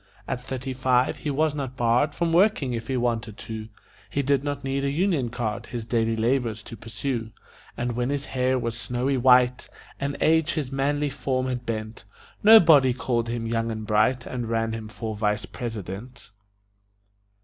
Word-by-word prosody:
At 125 - -3
thirty 130 +1 -4
five 130 -1 +2
he 150 - -4
was 150 +2 +1
not 135 -3 -5
barred 120 +5 +2
From 170 -1 0
working 170 - +3
if 115 -1 -4
he 130 - -1
wanted 115 -3 -1
to; 110 -1 -7 0.4
He 140 - -1
did 140 0 +2
not 145 -1 -3
need 135 +1 -1
a 140 - +1
union 155 -4 +1
card 115 -2 -3
His 120 -2 -5
daily 115 -1 +1
labors 115 -2 0
to 115 - -9
pursue; 115 0 -4 0.5
And 120 +1 -1
when 120 +2 -1
his 140 0 -2
hair 130 0 0
was 115 -2 -2
snowy 125 +4 -1
white 125 0 +4 0.3
And 140 0 -2
age 160 +1 +3
his 145 -5 -3
manly 145 +1 0
form 130 -1 -1
had 125 -2 -4
bent, 110 -2 -4 0.4
Nobody 160 - +7
called 120 -2 -1
him 115 -1 -3
young 115 0 -1
and 110 -1 -4
bright 110 +4 +2
And 120 -3 -4
ran 115 -1 0
him 110 -1 -5
for 110 0 -5
vice 105 0 0
president. 110 0 -7
125 Hz, 175 wpm, -25 LUFS, 115-140 Hz, 0.5 s, Nobody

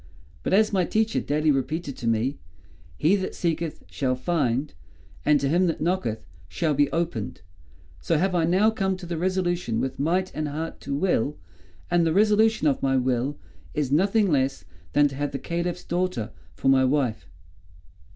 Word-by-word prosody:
But - - -3
as 215 +2 +4
my 185 -2 +3
teacher 220 +5 +1
daily 150 +1 +1
repeated 145 +2 -2
to 115 - -4
me, 115 +5 0 0.6
'He 165 +7 +3
that 190 - -4
seeketh 165 -2 -2
shall 130 -2 0
find, 135 -2 -1 0.5
and 150 -1 +5
to 140 - 0
him 175 +5 +3
that 165 - -1
knocketh 155 -11 -1 0.2
shall 160 -3 0
be 145 0 +2
opened,' 165 - -2 0.6
so 160 - +1
have 185 +4 +1
I 170 -2 +2
now 190 +6 +3
come 190 -3 -1
to 185 - -9
the 170 -1 -4
resolution 175 -9 0
with 130 +1 -3
might 180 +6 0
and 155 -1 -2
heart 155 +3 -5
to 140 - -3
will, 150 -3 0 0.5
and 175 -1 +4
the 165 -1 +2
resolution 215 0 +3
of 140 - +1
my 135 -1 +2
will 130 +2 0 0.4
is 145 -3 -1
nothing 195 +5 +3
less 135 -1 0 0.3
than 145 0 +5
to 135 - -8
have 145 -1 -2
the - - -1
Caliph's 170 +3 -3
daughter 175 -11 -2 0.2
for 135 - -3
my 135 -1 +5
wife." 130 -4 0
155 Hz, 175 wpm, -25 LUFS, 135-180 Hz, 0.6 s, and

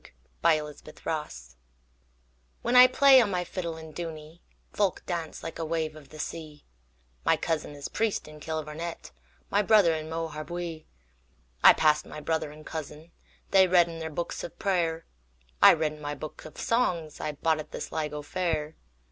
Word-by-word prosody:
The - - +5
Fiddler 155 -2 +2
of 145 - -18
Dooney 65 - -6 1.1
WHEN 240 +2 +1
I 250 0 +11
play 270 0 +7
on 220 - +1
my 180 -2 -1
fiddle 170 -2 -5
in 160 -1 -10
Dooney, 160 -1 -7 0.3
Folk 200 -3 0
dance 170 -3 -4
like 165 - -6
a - - -1
wave 160 -1 -2
of 150 -3 -14
the 155 - -12
sea; 155 -1 -7 0.6
My - - +3
cousin 155 -3 -2
is 145 -1 -6
priest 225 -2 -1
in 155 0 -12
Kilvarnet, 160 +2 -5 0.4
My 205 - +4
brother 205 -5 +5
in 155 0 -4
Moharabuiee.I 150 - -1
passed 150 -1 +2
my 150 - -8
brother 155 0 -1
and 155 +1 -13
cousin:They 160 +4 -1
read 175 -1 +5
in 165 -1 -7
their 160 0 -4
books 170 +2 -4
of - - -8
prayer;I 60 - +1
read 155 -2 0
in 150 - -13
my 145 0 -4
book 155 +2 -9
of 155 - -11
songsI 160 -10 -1
bought 160 -1 +2
at 155 - -7
the - - -6
Sligo 150 -2 -4
fair. 160 -2 -2
160 Hz, 165 wpm, -28 LUFS, 150-170 Hz, 1.1 s, I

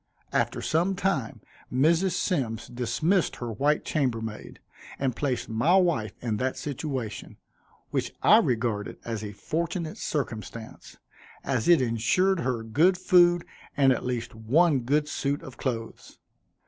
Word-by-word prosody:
After - - 0
some 175 +5 +1
time 180 - -1 0.3
Mrs. 165 +8 +3
Symmes 130 - -1
dismissed 125 - 0
her 120 -1 -5
white 145 +7 +1
chambermaid 115 -7 -2 0.4
and 130 -3 -1
placed 130 -5 -2
my 120 +11 +2
wife 170 - +2
in 110 -3 -1
that 130 +4 -1
situation, 130 -7 -5 0.5
which - - -1
I - - +7
regarded 110 -4 -1
as 115 -2 -4
a 105 - -5
fortunate 165 - -3
circumstance, 115 -5 -5 0.5
as 125 -5 -1
it 170 -6 +6
insured 145 - +2
her 125 -7 -1
good 160 +12 +3
food, 175 -2 +4 0.3
and 135 -2 +5
at - - -4
least 125 -1 -3
one 135 +8 +3
good 145 +5 +1
suit 145 -1 -2
of 130 - -10
clothes. 115 -3 -5
130 Hz, 135 wpm, -27 LUFS, 115-165 Hz, 0.5 s, I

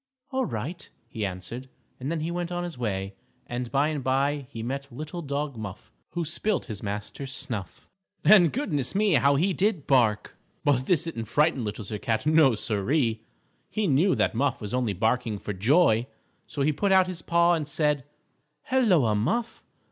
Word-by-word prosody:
_" - - -4
"All 265 - +2
right," 135 +10 -5 0.2
he 110 - -5
answered, 100 +7 -5 0.3
and 135 +4 -3
then 165 -2 -2
he 165 +2 -2
went 175 0 -3
on 175 0 -2
his 175 -2 -5
way, 100 -5 -3 0.3
and 120 0 -4
by 140 +2 +2
and 150 -4 -3
by 140 +1 0
he 115 - -6
met 140 +3 -4
Little 155 +7 -6
Dog 145 -2 -3
Muff, 110 -4 -8 0.2
who 170 -1 -1
spilt 180 +5 -1
his 110 -5 -6
master's 105 +6 -5
snuff. 105 -8 -5 0.4
And, 180 -7 +7
goodness 155 - -2
me! 205 -1 +3
How 140 0 +4
he 180 +7 +2
did 190 -5 0
bark! 110 -6 +2 0.3
But 135 -4 +2
this 170 -3 +3
didn't 160 -9 -4
frighten 145 +2 +2
Little 105 +1 -4
Sir 105 +1 -5
Cat. 115 -2 -1
No, 155 -5 +5
Siree. 110 +3 0 0.5
He 215 -1 -1
knew 170 +4 +3
that - - +1
Muff 130 +2 0
was 105 -1 -6
only 125 -5 0
barking 110 +2 0
for 105 - -5
joy. 120 - +3 0.4
So 140 - -2
he 150 +2 +2
put 200 +6 0
out 190 -1 +6
his 180 -2 -6
paw 170 +1 +3
and 155 -4 -1
said: 150 -2 +1 0.7
"Helloa, 180 - +4
Muff. 175 - -1
140 Hz, 185 wpm, -26 LUFS, 115-170 Hz, 0.7 s, And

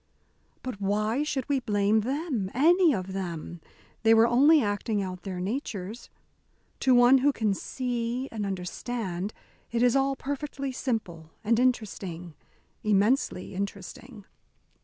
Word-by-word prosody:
"But 250 -6 -6
why 215 +6 0
should 275 -4 -2
we 280 -2 +1
blame 205 -2 +2
them 260 - -2
any 340 +5 +5
of 190 -5 -3
them? 175 -3 -5 0.4
They 225 0 +5
were 225 +1 +6
only 280 +7 +5
acting 205 +1 -1
out 185 -1 -6
their 185 -2 -5
natures. 210 0 -4 0.7
To 260 -1 +4
one 245 +2 +7
who 285 +3 +3
can 220 -6 0
see 245 +3 -3
and 220 -2 -4
understand, 195 0 -4 0.4
it 235 +1 +1
is 245 0 +4
all 275 0 +2
perfectly 275 0 -4
simple, 210 - -3
and 225 +2 +2
interesting 195 -9 -1 0.5
immensely 210 -1 +1
interesting." 200 +3 -6
225 Hz, 130 wpm, -27 LUFS, 195-260 Hz, 0.7 s, one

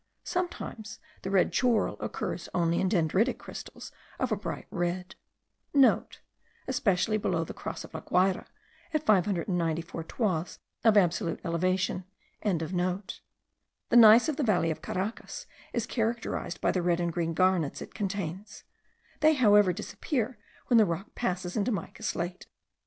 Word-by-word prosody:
Sometimes 235 - -4 0.2
the 190 - -4
red 195 -2 +3
schorl 245 -3 +2
occurs - - -4
only 170 -1 +2
in 190 - +1
dendritic 190 - +2
crystals - - -9 0.3
of - - -1
a - - +3
bright - - -5
red.* 180 +1 -2 0.9
(* 465 0 -22
Especially 215 -4 +1
below 175 -5 0
the - - -7
Cross - - -6
of - - -12
La 160 - -5
Guayra, 185 +1 +1 0.5
at 310 - +1
594 170 - +1
toises 180 -5 -1 0.3
of 220 -2 +5
absolute 170 -3 +2
elevation.) 185 +2 0 0.4
The 180 +1 -1 0.8
gneiss 230 +2 +9
of 305 -3 -1
the 295 - 0
valley 180 -8 +2
of 155 - -5
Caracas 195 +5 -4 0.3
is 235 -2 -1
characterized 225 -6 -2
by - - +3
the 185 - 0
red 175 0 +1
and 170 -1 -1
green 165 -1 -1
garnets 185 -4 +2
it - - -9
contains; 200 +1 -4 0.6
they 310 0 +5
however 205 -7 +5
disappear 240 - -3 0.3
when 240 -2 +5
the 215 - +6
rock 175 +3 -4
passes 180 -5 -2
into 215 +3 +1
mica 205 - -5
slate. 175 +1 -3
185 Hz, 140 wpm, -29 LUFS, 175-220 Hz, 0.9 s, gneiss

